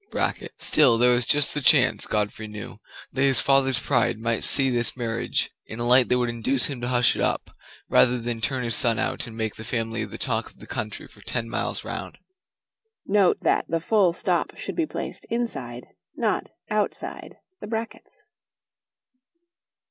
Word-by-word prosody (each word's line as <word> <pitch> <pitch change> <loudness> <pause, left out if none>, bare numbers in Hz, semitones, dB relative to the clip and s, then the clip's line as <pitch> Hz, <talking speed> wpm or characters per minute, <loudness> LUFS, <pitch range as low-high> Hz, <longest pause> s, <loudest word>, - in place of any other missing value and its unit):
Still 130 -7 +4
there 125 +1 +5
was 120 0 +1
just 145 0 +3
the 150 - -2
chance, 130 -1 +4
Godfrey 105 +1 -3
thought, 105 -2 -9 0.3
that 130 - -2
his 135 -2 +4
father's 135 -2 +3
pride 125 -4 +1
might 115 0 -2
see 135 -1 +6
this 120 +1 +2
marriage 115 -1 -2 0.2
in 110 - -8
a 120 - -2
light 125 +1 +4
that 125 - +3
would 125 -1 0
induce 120 +3 +2
him 135 -4 -2
to 120 - -3
hush 125 -1 +3
it - - -4
up, - - -1 0.4
rather 125 0 +4
than 115 -1 -4
turn 130 +2 -1
his 115 -2 -1
son 115 -3 +4
out 130 0 -2
and 115 -1 -11
make 110 -2 -3
the 110 - -8
family 115 -1 -3
the 105 - -8
talk - - -1
of - - -22
the - - -13
country 105 0 -5
for - - -19
ten 115 -2 -2
miles - - -3
round. - - -6 0.9
Note 195 -2 +3
that - - +1
the 165 - 0
full 190 +1 +2
stop 170 - -2
should - - -6
be 330 -3 -1
placed - - -6
inside, 235 0 -4 0.3
not - - -1 0.2
outside, - - -3 0.2
the - - -8
brackets. 225 +1 -7
125 Hz, 180 wpm, -24 LUFS, 115-135 Hz, 0.9 s, see